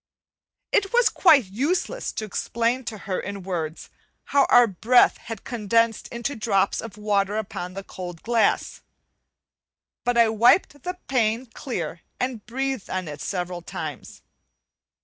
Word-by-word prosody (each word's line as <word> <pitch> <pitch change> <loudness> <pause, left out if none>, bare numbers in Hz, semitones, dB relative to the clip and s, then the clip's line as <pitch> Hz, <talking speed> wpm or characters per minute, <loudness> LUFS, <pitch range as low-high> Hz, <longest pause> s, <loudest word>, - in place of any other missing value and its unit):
It 390 -1 +2
was 485 0 +5
quite 305 - +5
useless 300 - -1
to 215 - -3
explain 235 +5 -1
to 225 -2 -5
her 190 -2 -1
in 200 -1 -6
words, 165 -4 -4 0.3
how 280 -1 +3
our 245 - +8
breath 230 +5 +4
had 225 -3 -8
condensed 230 -1 +1
into 235 +4 -4
drops 200 -4 +1
of 230 -2 -9
water 205 -1 0
upon 185 -4 -5
the 195 - -5
cold 175 -3 -8
glass; 235 -1 +1 1.2
but 245 -1 +1
I 230 -1 +6
wiped 240 - +3
the 360 +4 -4
pane 235 -1 +1
clear, 180 - -5 0.2
and 250 -4 -2
breathed 265 -2 -3
on 185 -2 -3
it 150 0 -7
several 180 -2 -3
times. - - -7
225 Hz, 140 wpm, -24 LUFS, 195-250 Hz, 1.2 s, our